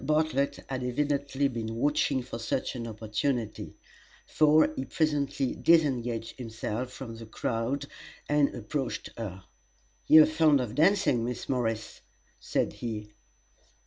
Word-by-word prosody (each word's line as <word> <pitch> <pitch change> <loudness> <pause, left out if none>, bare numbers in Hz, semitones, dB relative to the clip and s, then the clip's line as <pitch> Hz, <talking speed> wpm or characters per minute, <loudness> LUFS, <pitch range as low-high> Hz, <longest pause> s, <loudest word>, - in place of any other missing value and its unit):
Bartlett 150 -1 0
had 130 -1 -3
evidently 140 +1 0
been 115 -3 -4
watching 140 0 +1
for 115 - -7
such 115 +2 -2
an 115 -2 -4
opportunity, 110 +1 -3 0.5
for 155 0 +4
he 130 - -2
presently 145 -4 0
disengaged 125 -8 +1
himself 115 +1 -4
from 120 -3 -8
the 115 -1 -10
crowd 115 +6 -2 0.4
and 145 -1 +2
approached 130 +3 -4
her. 95 -5 -6 0.6
"You 155 0 +9
are - - +4
fond 155 -2 +4
of 120 -4 -3
dancing, 160 - +3
Miss 120 0 -4
Morris?" 115 -4 -2 0.4
said - - -1
he. 105 -3 -6
130 Hz, 125 wpm, -29 LUFS, 115-145 Hz, 0.6 s, You